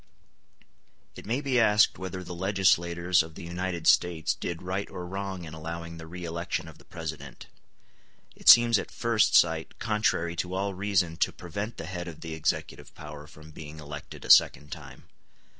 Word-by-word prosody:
It - - -11
may 120 +5 0
be 135 -3 +1
asked 105 -1 +4
whether 95 0 -5
the 90 - -7
legislators 90 -2 +2
of 80 -1 -8
the - - -9
United 85 0 -4
States 85 -3 +3
did 85 0 -5
right 95 +2 -3
or 90 - -7
wrong 95 0 -5
in 80 - -9
allowing 85 +1 -7
the 80 0 -10
re 90 +1 -7
election 85 0 -3
of 80 - -13
the - - -19
President. - - -8 0.9
It - - +2
seems 120 -2 +8
at - - -6
first 115 -2 +2
sight 80 -1 +3
contrary 105 -6 0
to 90 +2 -3
all 100 +1 -1
reason 90 -4 0
to - - +1
prevent 100 +6 -6
the 80 - -6
head 90 0 -5
of 85 -3 -9
the 80 -1 -6
executive 80 -1 -3
power 75 +1 -10
from 75 -1 -14
being 75 0 -10
elected 75 0 -9
a - - +4
second 75 +1 +5
time. 75 -5 -10
85 Hz, 175 wpm, -28 LUFS, 80-95 Hz, 0.9 s, seems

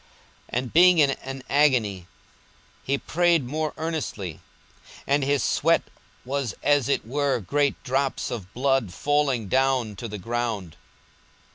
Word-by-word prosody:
42:022:044 - - -30 0.5
And 125 - -9
being 180 +1 +7
in 145 -3 +5
an 135 0 -7
agony 120 -11 +2 0.7
he 140 +1 0
prayed 170 -2 +2
more 155 +4 -2
earnestly: 150 - -4 0.7
and 140 0 +2
his 140 -1 +1
sweat - - +2 0.4
was 135 -4 -2
as 145 -2 +3
it 140 - 0
were 140 +2 0
great 140 +9 0
drops 135 +1 -1
of 100 -6 -6
blood 135 -5 +1
falling 140 -1 0
down 130 -2 +1
to 115 - -5
the 105 -1 -6
ground. 110 -5 -3
135 Hz, 135 wpm, -25 LUFS, 115-145 Hz, 0.7 s, being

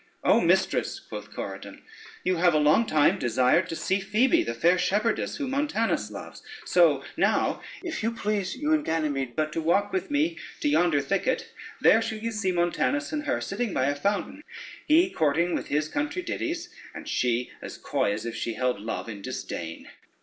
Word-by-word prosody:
"Oh, - - +4
mistress," - - +1
quoth - - -9
Corydon, - - -7 0.4
"you 185 -1 +1
have 175 -1 +4
a - - +5
long 155 +10 +4
time 150 -2 +3
desired 130 +8 +2
to 165 - -3
see 190 +4 0
Phoebe, 220 - +3
the - - -3
fair 175 +2 +3
shepherdess 210 +5 0
whom 275 -3 -3
Montanus 275 -5 0
loves; - - -9 0.2
so - - +4
now - - +1 0.2
if 340 -3 -4
you 225 - +1
please, 210 -4 -2
you 300 +4 0
and 305 -1 +2
Ganymede, 145 - -1
but 155 -1 -1
to 165 - -1
walk 195 - +1
with 375 -3 -1
me 310 +4 0 0.2
to 295 - +2
yonder 175 - +3
thicket, 195 - -1 0.3
there 225 - +6
shall 225 -1 -3
you 230 +2 -3
see 205 -4 -1
Montanus 175 - 0
and 300 -1 -3
her - - 0
sitting 240 -5 -3
by 130 - +2
a 145 +1 +1
fountain, 200 - -2 0.5
he 330 +4 +5
courting 160 +3 +1
with - - -2
his 150 +1 0
country 295 - -2
ditties, 340 0 -3 0.3
and - - -8
she 125 0 0
as - - -8
coy - - 0
as 105 +2 -4
if 115 -1 -4
she 115 - -3
held 125 -2 0
love 110 +2 -4
in 105 -3 -7
disdain." 85 -3 -6
190 Hz, 185 wpm, -26 LUFS, -, 0.5 s, there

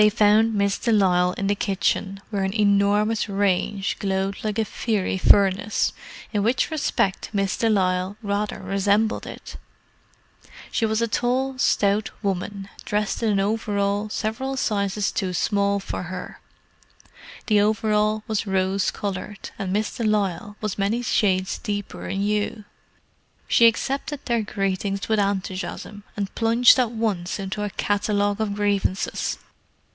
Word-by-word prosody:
They 210 - +7
found 215 +1 +4
Miss 200 -1 +1
de 235 - 0
Lisle 180 -4 +3
in 200 - -3
the 200 - +2
kitchen, 195 -1 -1
where 200 -2 -1
an 190 +3 -2
enormous 205 +2 +2
range 195 0 0
glowed 195 0 -1
like 215 -1 -2
a 220 - +1
fiery 205 -3 -1
furnace, 200 +2 +3 0.4
in 205 - +1
which 240 +8 +1
respect 205 -10 0
Miss 195 -2 0
de 225 - +1
Lisle 185 -1 +1
rather 205 0 -1
resembled 200 +3 +1
it. - - -9 1.1
She 225 - +1
was 220 +1 0
a - - +1
tall, 255 +4 0
stout 205 -2 +2
woman, 195 0 -3 0.2
dressed 210 +1 -1
in 225 - +1
an 200 -2 +2
overall 205 0 0
several 245 +6 -3
sizes 200 -4 0
too 185 -2 -2
small 200 +2 +1
for 195 - -5
her. 180 +1 -7 1.1
The 210 -3 +4
overall 215 0 +1
was 215 -1 -2
rose 190 0 +1
coloured, 200 0 -5
and 190 -2 -2
Miss 210 +2 -1
de 235 - -3
Lisle 205 -1 0
was 210 -2 -3
many 215 +5 0
shades 190 -5 +1
deeper 205 -1 -4
in 195 - -2
hue. 210 +1 -1 0.8
She 235 - +6
accepted 275 +5 -1
their 235 -2 +1
greetings 195 -1 -2
without 210 -3 +2
enthusiasm, 190 +2 -6 0.2
and 200 -1 -3
plunged 230 +3 +5
at 245 -3 +2
once 215 -6 -2
into 195 +1 -4
a 205 - -2
catalogue 205 +1 0
of 205 -2 -1
grievances. 200 -2 0
205 Hz, 145 wpm, -23 LUFS, 195-215 Hz, 1.1 s, They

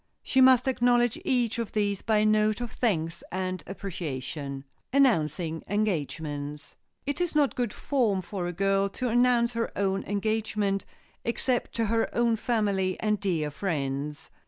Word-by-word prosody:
She 265 - +3
must 260 -1 +6
acknowledge 245 -2 +2
each 240 -3 +1
of 230 -3 -3
these 205 -2 0
by 220 -2 +2
a 210 - +3
note 215 0 +3
of 240 -2 -4
thanks 165 -8 -1
and 185 -2 -3
appreciation. 145 -7 -5 0.3
[Sidenote: - - -49
ANNOUNCING 165 - +2
ENGAGEMENTS] 150 -7 -2 0.3
It 285 +5 -2
is 350 -3 -1
not 290 -3 +3
good 240 -4 -1
form 220 -10 0
for 180 -1 -4
a - - -2
girl 195 +2 +1
to 250 +5 -3
announce 240 0 +3
her 230 0 -1
own 195 -1 0
engagement, 205 -1 -1 0.4
except 245 +1 -1
to 230 - +1
her 225 +1 +1
own 235 -1 +3
family 205 -5 0
and 210 -1 +1
dear 165 -7 -1
friends. 145 -4 -3
205 Hz, 155 wpm, -28 LUFS, 175-235 Hz, 0.4 s, must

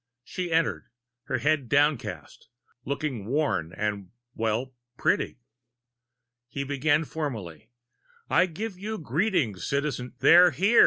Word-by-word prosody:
She 180 +4 -4
entered, 165 0 +1 0.4
her 130 - -1
head 150 -5 +1
downcast, 145 0 0 0.4
looking 140 -7 -3
worn 135 - 0
and 100 -1 -3 0.2
well, 115 +4 -1 0.2
pretty. - - +1 1.1
He 140 +3 -4
began 145 +3 +1
formally: 110 - -5 0.6
"I 185 - +4
give 190 +3 -6
you 215 +2 -4
greeting, 160 - 0
Citi 140 +1 -2
" - - -40
"They're 180 +1 +8
here!" 195 - +3
145 Hz, 115 wpm, -27 LUFS, 120-165 Hz, 1.1 s, They're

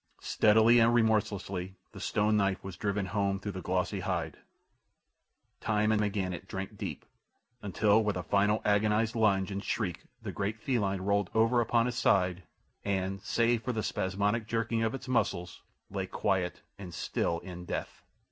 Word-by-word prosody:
Steadily 110 +3 +5
and 115 +1 +5
remorselessly 100 -5 0 0.2
the - - -10
stone 105 0 +1
knife 100 -2 +1
was 95 -2 -7
driven 100 0 -1
home 100 +1 0
through 105 +1 -4
the 95 - -6
glossy 90 +2 -1
hide—time 95 +4 -5
and 110 -1 +2
again 100 -3 -1
it 85 - -8
drank 95 0 -5
deep, - - -6 0.6
until 105 +2 +3
with 105 -3 0
a 90 - -3
final 105 +4 +2
agonized 105 +2 +2
lunge 100 -3 +2
and 100 +1 -4
shriek 95 -7 -2
the - - -5
great 100 +2 -2
feline 100 -6 0
rolled 100 0 +1
over 115 +2 +4
upon 115 0 +2
its 125 -1 -3
side 90 -5 +2 0.4
and, 95 -1 -1
save 115 +2 +1
for 125 +1 -2
the 110 -2 -2
spasmodic 100 +5 -1
jerking 115 0 0
of 115 +2 0
its 135 - -8
muscles, 90 -8 -1 0.3
lay 95 -1 -3
quiet 95 -3 -1 0.2
and 90 -4 -8
still 85 - -1
in 90 -1 -8
death. - - -5
100 Hz, 160 wpm, -30 LUFS, 95-110 Hz, 0.6 s, Steadily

